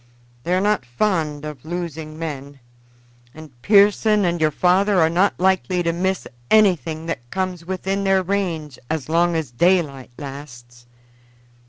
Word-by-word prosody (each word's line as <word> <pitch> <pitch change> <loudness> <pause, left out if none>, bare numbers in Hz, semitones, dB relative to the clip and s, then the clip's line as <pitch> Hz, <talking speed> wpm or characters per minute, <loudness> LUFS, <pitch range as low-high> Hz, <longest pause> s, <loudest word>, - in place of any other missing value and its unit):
They 180 - +1
are 185 - +1
not 210 -8 +1
fond 150 - -1
of 150 -5 -8
losing 160 -2 -6
men, 140 -3 -6 0.8
and 155 -2 -11
Pearson 205 - +4
and 170 -1 -1
your 155 - +4
father 185 +5 +2
are 160 -1 +3
not 185 +4 +1
likely 185 -1 +1
to 170 0 0
miss 190 +2 -1 0.2
anything 165 - +2
that 120 -7 -5
comes 185 -1 -3
within 190 +2 -2
their 195 -1 +2
range 170 -7 -3
as 155 -3 -3
long 170 +1 +2
as 155 -6 -3
daylight 150 -2 +1
lasts." 120 -4 -10
170 Hz, 145 wpm, -21 LUFS, 150-190 Hz, 0.8 s, Pearson